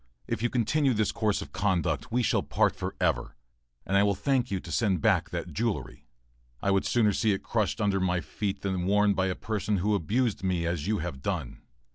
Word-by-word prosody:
If - - -2
you 120 - +1
continue 130 +3 +1
this 105 -1 +1
course 110 -3 0
of - - -13
conduct, 90 - 0
we 125 +1 +1
part - - +1
for - - -4
ever, - - 0 0.5
and 95 - -1
I 100 - +6
will 100 -1 +2
thank 125 +4 0
you 95 - -1
to - - -9
send 100 -7 +1
back - - +2
that - - -5
jewelry. 115 - -3 0.5
I 100 - 0
would 95 0 +2
sooner 110 -4 +3
see 110 +1 +2
it 95 - -4
crushed 110 0 -1
under 100 -2 +1
my 90 -1 +1
feet 100 +2 -4
than 95 -2 -1
worn 105 +1 +4
by 95 -1 +1
a 90 - -1
person 105 -1 -1
who 105 +4 +1
abused 105 - 0
me 90 -3 0
as 85 -2 -2
you 110 0 +1
have 65 -7 -6
done. - - -3
100 Hz, 210 wpm, -28 LUFS, 95-110 Hz, 0.5 s, I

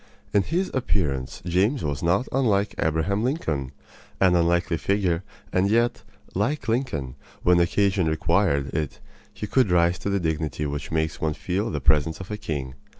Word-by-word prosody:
In 100 - +5
his 175 - -1
appearance 70 - -1
James 95 +10 +1
was 70 -1 -2
not 90 +8 +2
unlike 105 -6 +2
Abraham 80 +6 +1
Lincoln 80 - -1 0.5
an 95 -2 +5
unkingly 85 0 +2
figure; 95 -4 +1 0.3
and 95 +2 +3
yet, 120 +3 +2 0.3
like 125 +11 -1
Lincoln, 95 - -1 0.3
when 90 0 +5
occasion 95 +1 +2
required 80 -3 +1
it 75 -2 -2 0.3
he - - -6
could 125 0 +2
rise 85 0 +3
to - - -3
the 100 0 +1
dignity 80 -2 -2
which 70 0 -4
makes 80 0 -1
one 75 -1 0
feel 100 +5 -2
the 75 - -2
presence 75 +5 +2
of 95 +2 -8
a 105 - -2
king. 70 -10 -4
90 Hz, 160 wpm, -25 LUFS, 80-100 Hz, 0.5 s, In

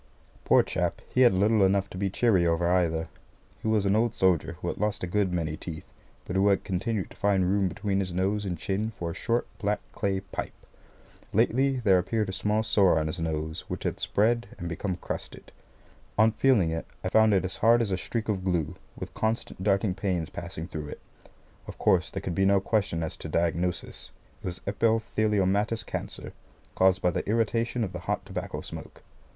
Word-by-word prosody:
Poor - - +6
chap, - - -1
he 130 - +2
had 120 -7 +6
little 105 +2 +4
enough 95 +1 +3
to - - -11
be 100 0 0
cheery 100 -3 +3
over 85 +1 +1
either. 85 -3 +1 0.5
He - - -3
was 110 -2 +2
an 100 +1 +3
old 115 0 +1
soldier 95 -4 +2
who - - -7
had - - -5
lost 105 -1 -1
a - - +2
good 95 +1 0
many 80 -3 -1
teeth, 80 0 -7 0.4
but 90 - -4
who 95 +1 +4
had 100 -1 +3
continued 100 +2 -2
to - - -13
find 100 -3 +2
room 100 0 +2
between 100 +1 -1
his 95 -2 -2
nose 95 +4 0
and 90 -3 -3
chin 100 +6 -1
for 85 -6 -5
a - - -6
short 120 +6 0
black 105 -1 0
clay 95 -1 -1
pipe. 95 - -6 0.8
Lately 130 +4 +2
there 95 -5 +5
appeared 105 +2 -1
a - - -3
small 105 +3 0
sore 100 -5 +4
on 80 - +1
his 80 +3 -3
nose 80 -1 -3
which - - -5
had - - -2
spread, 115 +1 +1
and 85 - -5
become 90 +2 -2
crusted. - - -7 0.7
On 110 +1 +5
feeling 110 -9 +3
it 80 0 -4 0.2
I 95 - -1
found 110 0 +5
it 95 -1 +2
as 95 - -4
hard 115 +2 +5
as 115 -4 0
a - - +2
streak 115 -2 -3
of 100 -4 -1
glue, 90 -5 0 0.2
with - - -7
constant 110 -3 -2
darting 100 -1 +2
pains 90 -4 -2
passing 85 -2 -6
through 75 -4 -6
it. - - -8 0.7
Of - - -8
course, 90 -1 +3
there 95 - -5
could 90 - -2
be 95 - +1
no 100 0 +5
question 95 -5 0
as 80 - -4
to 80 - -7
diagnosis. 85 +2 -1 0.3
It - - -5
was 90 0 -5
epitheliomatous 105 -1 +1
cancer, - - -6 0.4
caused 95 +1 +3
by 90 - +4
the 85 - -3
irritation 115 +2 +1
of 95 - -4
the - - -4
hot - - -1
tobacco - - -5
smoke. - - -9
95 Hz, 200 wpm, -27 LUFS, 90-110 Hz, 0.8 s, Poor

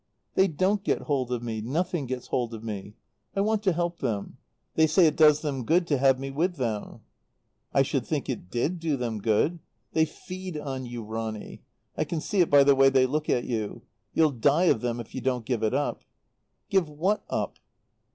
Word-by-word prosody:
"They 190 - +4
don't 190 +5 +1
get - - 0
hold 130 -4 -1
of 120 -1 -2
me 110 -2 -3
nothing 160 +5 -1
gets 125 0 -5
hold 120 -2 -1
of 110 - -9
me. 105 -1 -6 0.4
I 195 - +2
want 215 +1 +1
to 195 -3 +2
help 170 0 -2
them. 105 -3 -3 0.4
They 160 0 +4
say 165 +3 +5
it 155 -2 +3
does 150 -1 +6
them 140 -5 -2
good 170 +8 +3
to 145 -5 +1
have 135 -1 +4
me 135 0 -4
with 175 +6 0
them." 115 -7 -3 0.7
"I - - +4
should - - -1
think - - -2
it 90 - -4
did 145 - -1
do 160 -4 0
them 115 -4 -3
good! 115 - +1 0.3
They 160 0 +4
feed 185 +2 -7
on 135 -3 -4
you, 120 -1 -6
Ronny. 110 0 -5 0.3
I - - 0
can 165 - -3
see 195 +4 +1
it 170 - +3
by 145 -1 +7
the 140 0 +6
way 135 0 +6
they 130 -1 +4
look 150 +4 -2
at 120 - +2
you. 110 -4 -3 0.3
You'll 160 -2 +4
die 145 +8 +3
of 110 - -7
them 120 -1 -2
if 115 - -9
you 130 - -4
don't 125 -2 -1
give 120 -3 -1
it 110 +3 +1
up." 145 +1 -1 0.7
"Give 190 -5 +3
what 180 +8 0
up?" - - -2
140 Hz, 210 wpm, -27 LUFS, 120-165 Hz, 0.7 s, by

